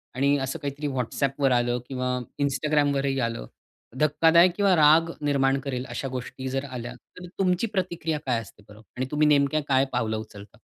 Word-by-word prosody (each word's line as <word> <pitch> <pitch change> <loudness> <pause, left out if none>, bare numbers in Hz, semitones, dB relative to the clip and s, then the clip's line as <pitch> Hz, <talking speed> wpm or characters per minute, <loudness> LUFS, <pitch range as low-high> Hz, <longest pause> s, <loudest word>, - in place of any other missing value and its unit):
आणि 140 +2 +2
असं 135 0 -3
काहीतरी 145 0 -4
WhatsAppवर 135 +1 -1
आलं 120 0 +1
किंवा 125 -1 -2 0.2
Instagramवरही 140 0 +1
आलं 115 - -3 0.5
धक्कादायक 165 +4 +5
किंवा 200 -2 +3
राग 160 +1 +5
निर्माण 140 -2 +1
करेल 130 -2 -4
अशा 135 - -4
गोष्टी 130 +1 -6
जर 135 +1 -2
आल्या, 125 -1 -6
तर 180 +8 -14
तुमची 185 +3 +1
प्रतिक्रिया 170 -5 -2
काय 125 -3 +1
असते 105 0 -15
बरं? 105 +1 -14 0.2
आणि 130 - -1
तुम्ही 150 0 +3
नेमक्या 145 +1 +3
काय 135 0 +3
पावलं 110 -3 -1
उचलता? 105 -2 -11
135 Hz, 160 wpm, -25 LUFS, 125-150 Hz, 0.5 s, धक्कादायक